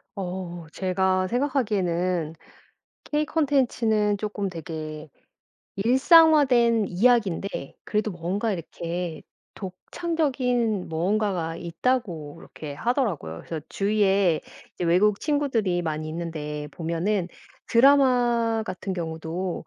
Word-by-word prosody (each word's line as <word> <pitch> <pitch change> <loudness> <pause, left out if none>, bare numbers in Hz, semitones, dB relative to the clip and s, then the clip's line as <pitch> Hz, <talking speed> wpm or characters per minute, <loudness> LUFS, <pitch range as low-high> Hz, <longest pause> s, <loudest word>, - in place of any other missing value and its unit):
어 180 -3 -5
제가 185 0 +1
생각하기에는 185 - 0 0.7
K 300 0 0
콘텐츠는 240 -9 +1
쪼끔 210 -1 -3
되게 155 -3 -7 0.7
일상화 290 - +6
된 235 -4 +3
이야기인데 195 - +1
그래도 215 0 -1
뭔가 190 +5 -2
이렇게 170 -1 -4 0.3
독창적인 250 - -1
무언가가 175 -1 -1
있다고 170 - -2
이렇게 150 -2 -9
하더라고요. 175 - -2
그래서 160 -2 -5
주위에 195 -4 +2 0.3
이제 - - -3
외국 195 +5 +3
친구들이 240 - 0
많이 155 -1 -3
있는데 155 -3 -5
보면은 170 +4 -1 0.4
드라마 240 -3 +4
같은 190 -1 -4
경우도 165 +1 -4
195 Hz, 255 characters per minute, -25 LUFS, 170-235 Hz, 0.7 s, 일상화